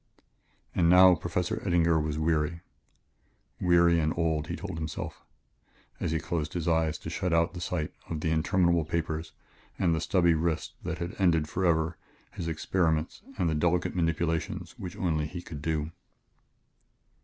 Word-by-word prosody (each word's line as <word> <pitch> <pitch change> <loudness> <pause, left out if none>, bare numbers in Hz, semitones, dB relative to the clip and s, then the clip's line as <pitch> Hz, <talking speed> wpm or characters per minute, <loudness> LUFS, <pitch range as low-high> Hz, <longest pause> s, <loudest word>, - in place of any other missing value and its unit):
And 85 -2 +3
now 90 +1 +8
Professor 85 +2 -2
Eddinger 85 -3 +3
was 75 -1 -2
weary 80 +1 0 1.0
weary 85 -1 +4
and 80 -1 +1
old, 80 -2 0
he - - -3
told 80 - -6
himself 80 0 -5 0.8
as - - -1
he 80 - +1
closed 75 -1 -3
his 85 -2 -3
eyes 80 -1 +2
to - - -7
shut 90 - -1
out 85 +1 +2
the 90 - -7
sight 85 -4 -2 0.2
of 80 -2 -3
the 80 - 0
interminable 85 +1 +2
papers 80 0 -3 0.5
and 85 -3 +2
the 80 - -1
stubby 85 -3 +3
wrist 80 0 -1
that - - -4
had 85 +1 -4
ended 85 -5 +3
forever 85 -2 +1 0.3
his 85 - -5
experiments 80 0 0 0.2
and 90 -4 +1
the 80 - +1
delicate 85 +4 +1
manipulations 80 -1 -1
which 90 -2 -6
only 80 -4 0
he 85 +3 -6
could 80 -4 -8
do. 80 0 -1
85 Hz, 155 wpm, -28 LUFS, 80-85 Hz, 1.0 s, now